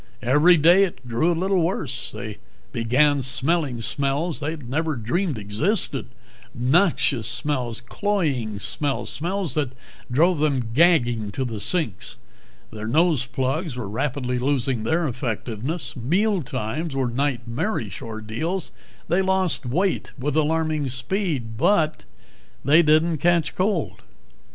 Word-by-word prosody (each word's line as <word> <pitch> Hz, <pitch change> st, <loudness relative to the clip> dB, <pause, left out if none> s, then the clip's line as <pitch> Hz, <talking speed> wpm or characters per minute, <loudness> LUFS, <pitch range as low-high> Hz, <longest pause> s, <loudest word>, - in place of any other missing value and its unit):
Every 150 Hz, +8 st, +5 dB
day 175 Hz, +6 st, +6 dB
it 130 Hz, -9 st, -4 dB
grew 120 Hz, +9 st, +1 dB
a 170 Hz, -, -1 dB
little 190 Hz, +1 st, +1 dB
worse. 165 Hz, -7 st, -2 dB
They 110 Hz, -4 st, -7 dB, 0.3 s
began 135 Hz, +5 st, +3 dB
smelling 135 Hz, 0 st, 0 dB
smells 145 Hz, +6 st, -1 dB
they 155 Hz, +2 st, -2 dB
never 150 Hz, +3 st, -2 dB
dreamed 135 Hz, -, -1 dB
existed 130 Hz, -, 0 dB, 0.5 s
noxious 135 Hz, -, +2 dB
smells, 120 Hz, -1 st, -2 dB
cloying 135 Hz, -, -1 dB
smells, 140 Hz, +7 st, -2 dB
smells 180 Hz, +2 st, -2 dB
that 145 Hz, -5 st, -1 dB, 0.4 s
drove 165 Hz, +6 st, +3 dB
them 135 Hz, -6 st, 0 dB
gagging 120 Hz, -9 st, +3 dB
to 130 Hz, -, -1 dB
the 115 Hz, -3 st, -4 dB
sinks. 115 Hz, -, 0 dB, 0.6 s
Their 110 Hz, 0 st, -6 dB
nose 155 Hz, 0 st, +2 dB
plugs 135 Hz, +4 st, -2 dB
were 120 Hz, -5 st, -4 dB
rapidly 125 Hz, +3 st, -2 dB
losing 130 Hz, -3 st, 0 dB
their 160 Hz, +6 st, +1 dB
effectiveness. 125 Hz, -, -4 dB
Mealtimes 150 Hz, -, -1 dB
were 135 Hz, -2 st, +1 dB
nightmarish 120 Hz, -, -2 dB
ordeals; 115 Hz, -, -4 dB, 0.4 s
they 175 Hz, +4 st, +2 dB
lost 190 Hz, -9 st, +1 dB
weight 180 Hz, +10 st, 0 dB
with 140 Hz, +2 st, -2 dB
alarming 155 Hz, -2 st, +1 dB
speed. 130 Hz, -, -2 dB
But 155 Hz, -, +2 dB, 0.6 s
they 155 Hz, +5 st, +6 dB
didn't 155 Hz, +1 st, +3 dB
catch 170 Hz, -1 st, +2 dB
cold. 185 Hz, -4 st, -1 dB
145 Hz, 120 wpm, -23 LUFS, 120-170 Hz, 0.6 s, day